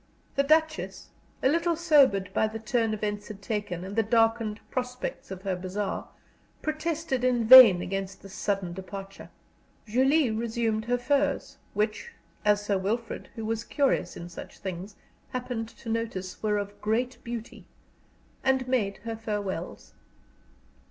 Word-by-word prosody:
The 280 Hz, -, +3 dB
Duchess, 315 Hz, +2 st, +1 dB, 0.3 s
a -, -, +5 dB
little 335 Hz, +4 st, +2 dB
sobered 280 Hz, -, +4 dB
by 220 Hz, -, +2 dB
the 220 Hz, +1 st, -5 dB
turn 225 Hz, 0 st, 0 dB
events 205 Hz, -1 st, -3 dB
had 210 Hz, -2 st, -8 dB
taken 205 Hz, -4 st, -3 dB
and 195 Hz, +2 st, -6 dB
the 225 Hz, -, +4 dB
darkened 225 Hz, -1 st, +2 dB
prospects 250 Hz, 0 st, -4 dB
of 190 Hz, -1 st, -7 dB
her 190 Hz, -2 st, -1 dB
bazaar, 190 Hz, +2 st, -3 dB, 0.6 s
protested 310 Hz, -4 st, -1 dB
in 245 Hz, -2 st, +2 dB
vain 230 Hz, -7 st, +10 dB
against 195 Hz, 0 st, -4 dB
this 195 Hz, -1 st, -11 dB
sudden 195 Hz, -4 st, -1 dB
departure. 195 Hz, +1 st, -8 dB, 0.6 s
Julie 260 Hz, +4 st, +3 dB
resumed 225 Hz, -1 st, -1 dB
her 245 Hz, +1 st, +1 dB
furs, 280 Hz, +2 st, 0 dB, 0.2 s
which, 215 Hz, -, -1 dB, 0.3 s
as 205 Hz, -1 st, +3 dB
Sir 200 Hz, -2 st, +1 dB
Wilfrid, 225 Hz, +5 st, -3 dB
who 225 Hz, -, -5 dB
was 225 Hz, +1 st, -1 dB
curious 270 Hz, -, 0 dB
in 170 Hz, -, -7 dB
such 175 Hz, -, -10 dB
things; 190 Hz, +1 st, -6 dB, 0.4 s
happened 245 Hz, -3 st, -3 dB
to 235 Hz, -, -15 dB
notice, 225 Hz, -5 st, -3 dB
were 210 Hz, -1 st, +1 dB
of 205 Hz, 0 st, -5 dB
great 240 Hz, +4 st, -1 dB
beauty, 235 Hz, -1 st, -7 dB, 0.8 s
and 265 Hz, -1 st, +2 dB
made 215 Hz, -7 st, 0 dB
her 225 Hz, -1 st, -3 dB
farewells. 205 Hz, -5 st, -4 dB
225 Hz, 145 wpm, -28 LUFS, 200-255 Hz, 0.8 s, vain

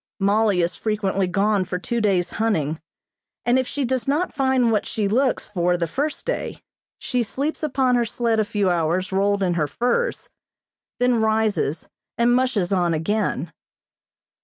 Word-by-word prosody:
Mollie 200 Hz, -2 st, +2 dB
is 170 Hz, +2 st, -1 dB
frequently 200 Hz, -3 st, -1 dB
gone 200 Hz, +2 st, +1 dB
for 180 Hz, 0 st, -3 dB
two 235 Hz, +6 st, -2 dB
days 185 Hz, -4 st, +1 dB
hunting, 160 Hz, -9 st, 0 dB, 0.6 s
and 245 Hz, +2 st, +3 dB
if 260 Hz, -, -1 dB
she 285 Hz, -2 st, -2 dB
does 255 Hz, -1 st, -2 dB
not 300 Hz, +6 st, 0 dB
find 265 Hz, -4 st, +2 dB
what 215 Hz, -, 0 dB
she 215 Hz, -3 st, -1 dB
looks 255 Hz, +6 st, +1 dB
for 180 Hz, -3 st, 0 dB
the 170 Hz, -, 0 dB
first 285 Hz, -, -3 dB
day -, -, -3 dB, 0.3 s
she 250 Hz, -1 st, -1 dB
sleeps 275 Hz, +7 st, -3 dB
upon 265 Hz, -4 st, +1 dB
her 240 Hz, -1 st, +3 dB
sled 230 Hz, 0 st, 0 dB
a -, -, +4 dB
few 205 Hz, -3 st, 0 dB
hours 175 Hz, +2 st, 0 dB
rolled 200 Hz, +1 st, +1 dB
in 180 Hz, -2 st, +1 dB
her 155 Hz, -3 st, 0 dB
furs, 365 Hz, -, -1 dB, 0.7 s
then 245 Hz, -2 st, +3 dB
rises 220 Hz, -8 st, 0 dB, 0.3 s
and 235 Hz, +1 st, +3 dB
"mushes" 235 Hz, -8 st, +1 dB
on 175 Hz, -3 st, +2 dB
again. 205 Hz, +8 st, -1 dB
215 Hz, 160 wpm, -22 LUFS, 185-245 Hz, 0.7 s, a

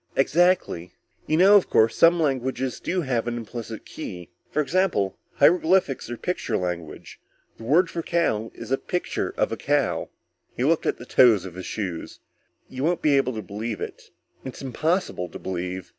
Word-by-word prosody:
"Exactly. 145 Hz, -, +2 dB, 0.3 s
You 155 Hz, -, +2 dB
know, 195 Hz, +4 st, +7 dB
of 195 Hz, -, 0 dB
course, 110 Hz, 0 st, +4 dB
some 170 Hz, +1 st, +5 dB
languages 130 Hz, -3 st, -1 dB
do 185 Hz, 0 st, -1 dB
have 125 Hz, -6 st, -1 dB
an 120 Hz, 0 st, -2 dB
implicit 115 Hz, -1 st, -7 dB
key? 90 Hz, -, -8 dB, 0.2 s
For -, -, -2 dB
example 145 Hz, -, +1 dB, 0.2 s
hieroglyphics 165 Hz, -3 st, +3 dB
or 120 Hz, -, -5 dB
picture 180 Hz, +8 st, -2 dB
language. 85 Hz, -4 st, -5 dB, 0.4 s
The 115 Hz, -, -10 dB
word 165 Hz, +9 st, +4 dB
for 170 Hz, -, -4 dB
cow 115 Hz, -11 st, 0 dB
is -, -, -9 dB
a 135 Hz, -, +2 dB
picture 180 Hz, -, -2 dB
of -, -, +1 dB
a -, -, -3 dB
cow." -, -, 0 dB, 0.5 s
_He 125 Hz, -, +1 dB
looked 165 Hz, 0 st, +2 dB
at -, -, 0 dB
the 120 Hz, -, -10 dB
toes 115 Hz, -7 st, +5 dB
of 90 Hz, -, -8 dB
his 95 Hz, +1 st, -7 dB
shoes. 90 Hz, -6 st, -5 dB, 0.5 s
"You 130 Hz, +1 st, -6 dB
won't 170 Hz, +2 st, 0 dB
be 150 Hz, -2 st, +4 dB
able 130 Hz, -2 st, +2 dB
to 110 Hz, -1 st, -5 dB
believe 105 Hz, +2 st, -5 dB
it. -, -, -7 dB, 0.3 s
It's 130 Hz, +1 st, -8 dB
impossible 155 Hz, -, -1 dB
to -, -, -8 dB
believe. 90 Hz, 0 st, -5 dB
130 Hz, 175 wpm, -24 LUFS, 105-165 Hz, 0.5 s, know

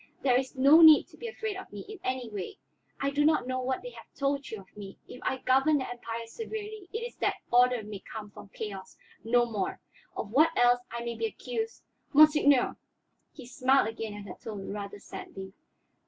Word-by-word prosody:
There 255 Hz, -3 st, +4 dB
is 260 Hz, +1 st, -1 dB
no 280 Hz, +5 st, +7 dB
need 315 Hz, -2 st, +9 dB
to -, -, -17 dB
be 470 Hz, -, -6 dB
afraid 440 Hz, -2 st, -4 dB
of 380 Hz, -, -10 dB
me 205 Hz, -1 st, -7 dB
in 425 Hz, -2 st, -10 dB
any 255 Hz, -1 st, -2 dB
way. 205 Hz, -4 st, -6 dB, 0.4 s
I 275 Hz, 0 st, 0 dB
do 290 Hz, +1 st, +1 dB
not 310 Hz, -4 st, +3 dB
know 255 Hz, 0 st, -2 dB
what 260 Hz, +1 st, -2 dB
they -, -, -7 dB
have -, -, -14 dB
told 280 Hz, 0 st, -1 dB
you 220 Hz, -, -6 dB
of 190 Hz, -, -17 dB
me; 200 Hz, -2 st, -9 dB
if 250 Hz, -, -11 dB
I 265 Hz, -, -1 dB
govern 270 Hz, +4 st, +3 dB
the 260 Hz, -, -3 dB
Empire 230 Hz, -1 st, -6 dB
severely, 430 Hz, -, -7 dB
it 450 Hz, -, -3 dB
is 480 Hz, -, -6 dB
that -, -, 0 dB, 0.2 s
order 245 Hz, -1 st, +4 dB
may 205 Hz, -1 st, -7 dB
come 210 Hz, 0 st, -9 dB
from 200 Hz, -, -12 dB
chaos, 195 Hz, -2 st, -7 dB, 0.3 s
no 240 Hz, +1 st, +3 dB
more. 210 Hz, -5 st, -3 dB, 0.4 s
Of 205 Hz, -, -4 dB
what 315 Hz, +6 st, +4 dB
else 245 Hz, 0 st, +5 dB
I 235 Hz, 0 st, -5 dB
may 235 Hz, -, -2 dB
be 450 Hz, -, -2 dB
accused 450 Hz, 0 st, -5 dB, 0.2 s
" -, -, -39 dB
"Monseigneur!" 295 Hz, -3 st, +5 dB, 0.5 s
He 265 Hz, -, -12 dB
smiled 255 Hz, -1 st, +2 dB
again 225 Hz, -2 st, -6 dB
at 205 Hz, -1 st, -8 dB
her -, -, -7 dB
tone, 200 Hz, -3 st, -6 dB
rather 205 Hz, 0 st, -6 dB
sadly. 190 Hz, -1 st, -9 dB
255 Hz, 210 wpm, -29 LUFS, 220-300 Hz, 0.5 s, need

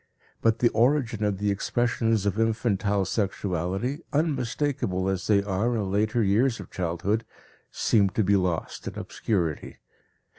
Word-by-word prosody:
But 115 Hz, 0 st, +3 dB
the 120 Hz, 0 st, +3 dB
origin 120 Hz, -2 st, +1 dB
of 105 Hz, -2 st, 0 dB
the 105 Hz, +1 st, 0 dB
expressions 115 Hz, 0 st, 0 dB
of 100 Hz, +2 st, 0 dB
infantile 105 Hz, -3 st, +1 dB
sexuality, 95 Hz, -, -2 dB
unmistakable 140 Hz, -, 0 dB
as 95 Hz, -1 st, -2 dB
they 100 Hz, -2 st, +4 dB
are 105 Hz, +5 st, 0 dB
in 100 Hz, -4 st, -2 dB
later 110 Hz, +3 st, +1 dB
years 115 Hz, +5 st, +2 dB
of -, -, -10 dB
childhood, 95 Hz, +5 st, -1 dB, 0.5 s
seem 100 Hz, -4 st, +2 dB
to 110 Hz, -, +4 dB
be 100 Hz, +1 st, +3 dB
lost 90 Hz, -4 st, -2 dB
in -, -, -6 dB
obscurity. 85 Hz, -8 st, -2 dB
105 Hz, 140 wpm, -26 LUFS, 95-115 Hz, 0.5 s, they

